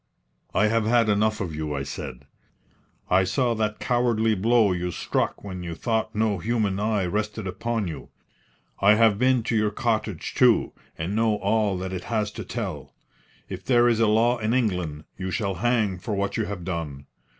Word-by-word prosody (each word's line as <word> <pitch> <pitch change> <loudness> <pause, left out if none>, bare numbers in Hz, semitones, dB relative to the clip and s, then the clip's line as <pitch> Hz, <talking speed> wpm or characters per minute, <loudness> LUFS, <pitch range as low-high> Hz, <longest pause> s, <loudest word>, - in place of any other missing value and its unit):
"I 105 - +4
have 110 0 +2
had 115 -1 +3
enough 105 +1 +2
of 85 -5 -3
you," 75 -1 -3
I 70 - -2
said. 70 -1 -7 0.8
"I 95 +1 +4
saw 120 +6 +1
that 110 -1 -1
cowardly 120 -3 +1
blow 110 +1 +3
you 90 0 -2
struck - - -2
when 95 -3 -6
you 85 -1 -5
thought 110 +3 -1
no 105 -3 +1
human 105 -1 0
eye 105 -2 0
rested 105 +3 -2
upon 115 +2 -2
you. 80 -3 -7 0.7
I 100 +2 +6
have 110 -2 +4
been 125 -2 +3
to 115 - -1
your 105 -1 +2
cottage, 110 -4 -2
too, - - +4 0.2
and 85 +6 -3
know 110 -1 +2
all 105 -1 +1
that 95 +1 -4
it 90 -1 -5
has 105 -3 -1
to - - -7
tell. - - -5 0.5
If - - -7
there 120 -2 +4
is 115 -2 +2
a 115 - +4
law 115 +3 +3
in 110 +2 0
England, 90 -11 -1 0.2
you 95 0 -3
shall 100 +1 -1
hang 110 -6 +1
for 105 +3 -3
what 100 0 -1
you 110 - 0
have 100 -4 -6
done. 80 -6 -4
105 Hz, 185 wpm, -25 LUFS, 95-115 Hz, 0.8 s, I